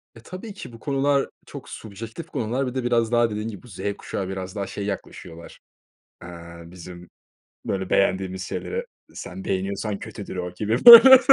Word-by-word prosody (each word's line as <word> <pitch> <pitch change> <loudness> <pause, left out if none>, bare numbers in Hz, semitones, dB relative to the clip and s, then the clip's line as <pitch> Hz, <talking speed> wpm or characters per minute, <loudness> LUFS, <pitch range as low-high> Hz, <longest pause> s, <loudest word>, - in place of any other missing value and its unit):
E, - - -13
tabii 185 - -9
ki 190 - -10
bu 115 - -12
konular 140 +1 0 0.2
çok - - -11
subjektif 110 - -9
konular. 125 +4 -2
Bir 125 - -6
de 130 - -2
biraz 120 -1 +1
daha 120 -1 +3
dediğin 105 +1 -4
gibi 110 +3 -9
Z 95 - -12 0.2
kuşağı 95 - -5
biraz 95 -1 -6
daha 100 -2 -3
şey 100 - -6
yaklaşıyorlar. 85 -4 -8 0.6
Eee, 85 - -9 0.4
bizim 90 0 -12 0.6
böyle 95 -1 -3
beğendiğimiz 95 -1 0
şeyleri 475 - -5 0.3
“Sen 190 - -8
beğeniyorsan 100 - -3
kötüdür.” 105 -3 -8
O 90 -1 -5
gibi, 110 - -2
böyle. 245 +2 +12
110 Hz, 165 wpm, -23 LUFS, 95-125 Hz, 0.6 s, böyle